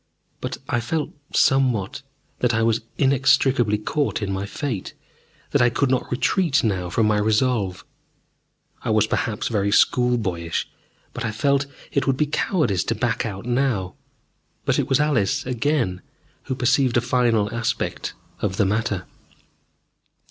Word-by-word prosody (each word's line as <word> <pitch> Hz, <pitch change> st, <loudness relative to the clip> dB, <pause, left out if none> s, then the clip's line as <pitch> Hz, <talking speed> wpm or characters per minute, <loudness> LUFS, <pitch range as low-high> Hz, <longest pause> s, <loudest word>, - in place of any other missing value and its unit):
But -, -, -4 dB
I 120 Hz, -, +1 dB
felt 150 Hz, +7 st, -2 dB, 0.2 s
somewhat 130 Hz, -3 st, +2 dB, 0.4 s
that 120 Hz, -2 st, +2 dB
I 115 Hz, -, +2 dB
was 115 Hz, +1 st, +2 dB, 0.2 s
inextricably 135 Hz, -4 st, +3 dB
caught 145 Hz, +7 st, -1 dB
in 95 Hz, -1 st, -2 dB
my 95 Hz, +1 st, -3 dB
fate, 115 Hz, -4 st, -4 dB, 0.6 s
that -, -, +3 dB
I 120 Hz, -, +5 dB
could 130 Hz, +2 st, 0 dB
not 130 Hz, -, 0 dB
retreat 155 Hz, +3 st, +1 dB
now 95 Hz, -5 st, 0 dB
from 110 Hz, +4 st, +1 dB
my 105 Hz, -1 st, +2 dB
resolve. 105 Hz, -3 st, +1 dB, 1.0 s
I -, -, -4 dB
was 110 Hz, -1 st, +4 dB
perhaps, 110 Hz, 0 st, -1 dB
very 100 Hz, -3 st, 0 dB
school 125 Hz, +3 st, +3 dB
boyish, 85 Hz, -6 st, -2 dB, 0.5 s
but 125 Hz, -, -5 dB
I 115 Hz, -, -1 dB
felt 140 Hz, +5 st, +1 dB
that 140 Hz, -, -23 dB, 0.2 s
it 140 Hz, -, +2 dB
would 135 Hz, -1 st, +2 dB
be 150 Hz, -, +2 dB
cowardice 145 Hz, -, 0 dB
to 115 Hz, -, 0 dB
back 115 Hz, +1 st, -1 dB
out 100 Hz, 0 st, -6 dB
now. 120 Hz, -7 st, 0 dB, 0.7 s
But -, -, +2 dB
it -, -, -1 dB
was 135 Hz, -, +3 dB
Alice 140 Hz, -10 st, +1 dB
again 125 Hz, -7 st, 0 dB, 0.4 s
who 130 Hz, -, -2 dB
perceived 130 Hz, 0 st, +2 dB
a -, -, +3 dB
final 120 Hz, -4 st, +1 dB
aspect 115 Hz, 0 st, -2 dB, 0.2 s
of 95 Hz, -1 st, -2 dB
the 105 Hz, -, +3 dB
matter. 105 Hz, -2 st, -1 dB
120 Hz, 155 wpm, -23 LUFS, 105-135 Hz, 1.0 s, I